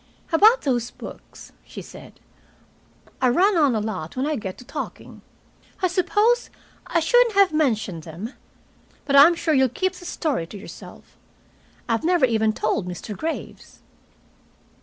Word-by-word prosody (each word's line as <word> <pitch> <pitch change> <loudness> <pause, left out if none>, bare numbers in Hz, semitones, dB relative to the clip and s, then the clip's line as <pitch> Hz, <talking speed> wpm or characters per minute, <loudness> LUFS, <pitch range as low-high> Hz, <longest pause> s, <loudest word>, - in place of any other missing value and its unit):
"About 435 +9 +5
those 245 -4 -1
books," - - -12
she - - -10
said. - - -13 1.0
"I 255 - +4
run 375 +10 +3
on 290 -7 +3
a - - +1
lot 210 -4 -5
when 260 - 0
I 305 0 -1
get 190 -7 -6
to 250 - -13
talking. - - -8 0.6
I 370 - +2
suppose 415 +6 +1 0.4
I 335 - +1
shouldn't 480 +7 +3
have 395 -4 +4
mentioned 220 - 0
them. 175 - -8 0.7
But 280 - 0
I'm 300 +5 +8
sure 325 -1 0
you'll 265 -2 +3
keep 375 +10 -1
the 360 - -12
story 290 - -2
to 205 - -10
yourself. 200 - -13 0.7
I've 230 -1 0
never 345 -4 +3
even 220 -2 +1
told 215 -3 -1
Mr. 180 +4 -6
Graves." 320 - -6
275 Hz, 150 wpm, -23 LUFS, 220-355 Hz, 1.0 s, I'm